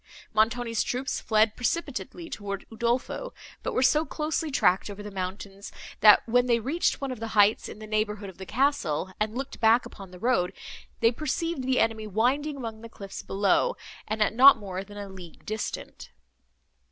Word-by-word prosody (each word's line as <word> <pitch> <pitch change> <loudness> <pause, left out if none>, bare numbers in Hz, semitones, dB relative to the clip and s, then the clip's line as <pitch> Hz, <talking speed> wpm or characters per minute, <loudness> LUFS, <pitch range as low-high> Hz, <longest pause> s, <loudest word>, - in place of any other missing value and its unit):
Montoni's 230 +1 +1
troops 260 +2 -2
fled 220 -1 +3
precipitately 285 +4 -3
towards 200 -7 -5
Udolpho, 240 - -2 0.3
but - - -3
were 255 - +3
so 300 +4 +4
closely 310 +1 -2
tracked 195 -8 +2
over 205 0 -8
the 210 - -7
mountains, 195 +1 -6 0.3
that, 210 +2 +7
when 245 +2 +3
they 235 -1 +3
reached 285 +10 0
one 275 -1 -2
of 250 - -6
the 225 - -4
heights 205 +1 +4
in - - -9
the 215 - -9
neighbourhood 215 -1 -2
of 190 -1 -12
the 190 - -7
castle, 190 - 0
and 215 +2 -1
looked 270 - -5
back 225 +2 +4
upon 195 -2 -11
the 180 - -12
road, 185 -4 +1 0.5
they 230 0 +5
perceived 310 +4 -2
the 260 0 +2
enemy 220 -1 0
winding 265 +8 0
among 225 -4 -6
the 230 - -9
cliffs 200 -3 -8
below, 205 - +1 0.3
and 215 0 +1
at - - 0
not 265 +4 +8
more 190 -3 -5
than 205 +1 -12
a 205 -1 -6
league 185 -3 -12
distant. 215 0 -5
225 Hz, 180 wpm, -27 LUFS, 205-260 Hz, 0.5 s, not